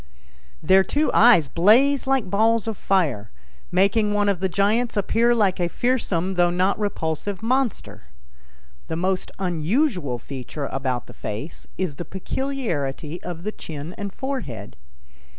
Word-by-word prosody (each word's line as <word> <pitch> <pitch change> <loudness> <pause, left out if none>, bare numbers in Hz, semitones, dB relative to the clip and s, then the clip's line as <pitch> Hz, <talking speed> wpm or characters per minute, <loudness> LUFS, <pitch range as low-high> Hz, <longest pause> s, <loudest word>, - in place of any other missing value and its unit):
Their 190 0 +5
two 295 +9 0
eyes 225 -11 +6
blaze 245 - +4
like 270 -6 +1
balls 220 +3 +2
of 225 - -2
fire, 145 - 0 0.4
making 200 +4 +2
one 205 0 +2
of 195 -3 0
the 190 0 0
giants 215 +5 +1
appear 230 +4 +2
like 200 -5 +2
a 175 - +1
fiersome 190 -7 -1
though 175 0 +4
not 185 +4 +1
repulsive 200 0 -3
monster. 225 - -1 0.8
The 160 - -3
most 185 +2 -1
unusual 180 - 0
feature 135 +3 -6
about 130 -2 -2
the - - -13
face 110 +10 -7
is 175 -7 -3
the 175 - -5
peculiarity 180 - -3
of 175 -1 -7
the 215 - -2
chin 155 -3 -7
and 200 -1 -5
forehead. 190 - -5
190 Hz, 140 wpm, -23 LUFS, 160-225 Hz, 0.8 s, eyes